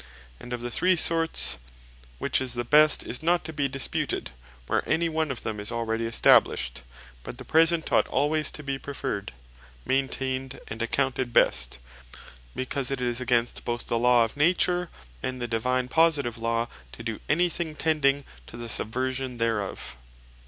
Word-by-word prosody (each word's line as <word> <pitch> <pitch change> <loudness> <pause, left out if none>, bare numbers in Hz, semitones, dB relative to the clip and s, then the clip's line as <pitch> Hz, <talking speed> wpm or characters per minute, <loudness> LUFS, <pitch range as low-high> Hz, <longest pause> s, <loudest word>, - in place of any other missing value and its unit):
And 125 - -11
of 120 -1 -3
the 120 - -3
three 185 +8 +2
sorts, 165 - +2 0.6
which - - 0
is 125 -2 0
the 120 - -1
best, 150 +4 +5
is 125 - -3
not 170 0 +1
to 160 - -6
be 145 -2 0
disputed, 130 - -2 0.3
where - - +1
any 170 +1 +2
one 160 -1 -1
of 130 - -4
them 110 -1 -4
is 105 +2 -3
already 115 -1 -2
established; 65 - +3 0.4
but 120 - -9
the 125 - -9
present 165 +1 +3
ought - - +3
alwaies 150 +2 +1
to 150 - -8
be 135 -1 -3
preferred, 105 -8 -4 0.5
maintained, 130 0 -2
and 110 +1 -6
accounted 130 0 -1
best; 60 - +3 0.8
because 130 0 -1
it 135 -1 -2
is 125 0 -1
against 120 -1 0
both 120 0 -2
the 115 - 0
Law 120 -1 +5
of 115 - -8
Nature, 175 +3 +2 0.3
and 130 0 -4
the 120 - -3
Divine 125 +3 0
positive 145 -5 +2
Law, 115 +1 -1 0.3
to 115 - -9
doe 115 -2 -4
any 175 +4 +3
thing 165 -2 -3
tending 145 -3 +1 0.2
to 115 - -10
the 120 -1 -6
subversion 130 +3 -1
thereof. 105 - -2
130 Hz, 165 wpm, -26 LUFS, 115-150 Hz, 0.8 s, best